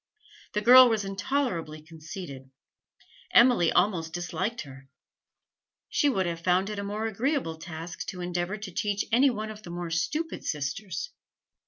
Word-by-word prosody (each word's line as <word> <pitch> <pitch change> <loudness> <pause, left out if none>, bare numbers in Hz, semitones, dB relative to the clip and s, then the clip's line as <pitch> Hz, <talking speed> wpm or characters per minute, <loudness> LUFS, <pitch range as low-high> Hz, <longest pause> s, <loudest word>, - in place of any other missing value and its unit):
The 210 - 0
girl 250 +3 +9
was 220 -3 0
intolerably 195 - -2
conceited. 155 -4 -9 0.9
Emily 235 -9 +6
almost 175 -4 +1
disliked 185 +6 -3
her; 135 -2 -12 1.0
she 290 - +2
would 195 -8 +1
have 170 -1 -3
found 185 +4 +2
it 210 - -4
a - - -3
more 210 +2 -3
agreeable 225 - -1
task 165 0 -7
to 180 - -6
endeavour 175 +3 -2
to 205 -2 -7
teach 205 +3 -1
any 260 +4 +5
one 215 -3 -4
of 215 0 -10
the 180 - -11
more 175 -1 -5
stupid 300 - -2
sisters. 180 - -3
190 Hz, 150 wpm, -27 LUFS, 165-220 Hz, 1.0 s, girl